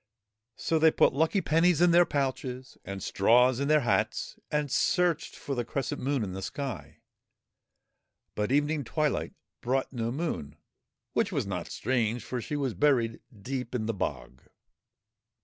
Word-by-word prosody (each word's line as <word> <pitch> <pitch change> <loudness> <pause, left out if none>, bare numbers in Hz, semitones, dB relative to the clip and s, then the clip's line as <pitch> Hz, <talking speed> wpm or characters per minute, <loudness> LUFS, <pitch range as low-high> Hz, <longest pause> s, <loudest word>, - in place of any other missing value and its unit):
So 160 - 0
they 160 +1 +6
put - - +3
lucky 160 +7 +2
pennies 165 +1 +3
in 175 0 +5
their 175 +1 +6
pouches 130 -2 -3
and 100 -1 -6
straws 125 +5 +4
in 140 - 0
their 150 0 +4
hats, 120 - 0
and 150 -2 -1
searched 180 +1 +1
for 140 - -5
the 120 -2 -1
crescent 130 +2 -3
Moon 135 -2 0
in 95 -3 -4
the 95 - -5
sky. 130 +2 -5 1.4
But 105 +2 -2
evening 145 +1 +1
twilight 150 +3 -1 0.3
brought 130 +2 -1
no 115 -2 -2
Moon, 130 - -3 0.6
which - - +1
was - - -1
not - - -4
strange, 115 -2 -1
for 125 0 -4
she 150 - -4
was 135 -5 -1
buried 115 +1 +2 0.2
deep 130 0 -4
in 110 -3 -1
the 115 - -1
bog. 65 - -4
130 Hz, 155 wpm, -29 LUFS, 115-150 Hz, 1.4 s, they